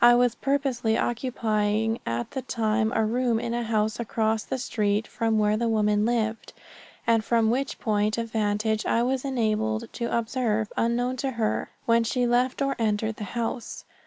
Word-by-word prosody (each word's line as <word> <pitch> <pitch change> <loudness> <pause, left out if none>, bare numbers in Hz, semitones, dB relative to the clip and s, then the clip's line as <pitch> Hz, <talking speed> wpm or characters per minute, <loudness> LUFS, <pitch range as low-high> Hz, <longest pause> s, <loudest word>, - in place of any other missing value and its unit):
I 240 0 +8
was 245 -1 +3
purposely 260 -4 0
occupying 225 -3 0
at 115 +1 -2
the 265 - -3
time 220 -3 0
a 220 - +2
room 235 0 +1
in 235 0 -3
a 240 - -1
house 220 -1 0
across 220 -1 0
the - - -3
street 215 -4 0
from 225 -2 0
where 210 0 +3
the 235 +1 0
woman 210 -1 +2
lived, 225 -2 -1 0.5
and 225 -1 +3
from 225 0 +2
which 270 +3 -1
point 210 0 0
of 230 -1 -3
vantage 215 0 0
I 230 - +2
was 260 +1 0
enabled 220 -3 -1
to 235 - -3
observe, 220 -2 -1
unknown 245 +2 0
to 270 +2 -1
her, 220 -2 0 0.2
when 230 0 +4
she 245 +2 0
left 250 +3 +1
or 275 0 0
entered 220 0 0
the 210 - -5
house. 235 +1 -3
225 Hz, 175 wpm, -26 LUFS, 215-240 Hz, 0.5 s, I